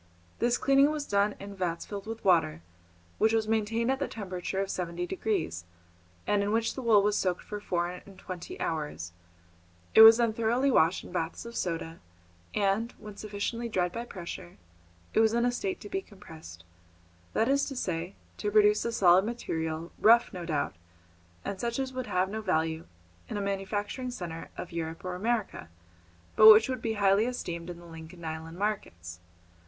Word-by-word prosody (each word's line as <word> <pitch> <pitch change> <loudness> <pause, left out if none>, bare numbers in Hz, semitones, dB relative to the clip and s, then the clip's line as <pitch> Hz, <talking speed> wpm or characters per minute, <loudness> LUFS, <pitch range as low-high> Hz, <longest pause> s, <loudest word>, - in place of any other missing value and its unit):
This 240 +1 +2
cleaning 275 +1 +4
was 305 -1 -3
done 200 -2 +1
in 200 0 -8
vats 175 -3 -2
filled 205 0 -7
with 225 -1 -7
water, 85 - +3 0.6
which 220 +1 +3
was 220 -1 +1
maintained 225 +2 +1
at 265 - -1
the 280 - -1
temperature 190 -2 -4
of 195 0 -1
seventy 175 -1 -3
degrees, 180 - -2 0.6
and 205 -1 +2
in 200 +1 0
which 225 +1 +1
the 265 - -6
wool 220 -4 +5
was 205 0 +2
soaked 180 -3 0
for 210 - -6
four 175 -4 -1
and 180 +2 -10
twenty 185 -2 -8
hours; 150 - -3 0.8
it - - +9
was 225 0 +11
then 235 -2 +2
thoroughly 235 +5 +1
washed 170 -5 +3
in - - -11
baths 165 +2 -3
of 235 0 -8
soda, 165 -1 -3 0.6
and, 210 +3 +1
when 210 -1 -10
sufficiently 215 +3 -4
dried 180 -4 0
by 230 +5 -4
pressure, 175 -4 -8 0.6
it - - +3
was 220 0 +4
in 235 0 +2
a 245 - +2
state 375 +9 -3
to - - -8
be 385 - -2
compressed, 160 - -13 0.7
that 225 - +2
is 280 +1 +2
to 275 - -6
say, 180 -5 -3 0.2
to 210 - -2
produce 210 0 +4
a 235 - 0
solid 185 -4 +5
material, 165 -8 -3
rough, 230 +1 +5
no 180 -2 -6
doubt, 150 - -1 0.7
and 195 - -4
such 235 +1 -2
as 265 -1 -3
would 255 -1 -4
have 185 +1 +1
no 215 +3 -4
value 160 -4 -1 0.4
in - - -3
a - - -2
manufacturing 205 +5 -3
centre 170 -8 -6
of 180 - -6
Europe 165 0 -5
or 185 - -3
America, 210 - -2 0.7
but 215 0 +11
which 215 +1 +7
would 255 -2 -3
be 225 - -1
highly 200 0 +3
esteemed 175 -9 -4
in 175 - -6
the 175 - -13
Lincoln 165 +1 -11
Island 160 +1 -6
markets. 90 - -4
200 Hz, 185 wpm, -29 LUFS, 175-225 Hz, 0.8 s, was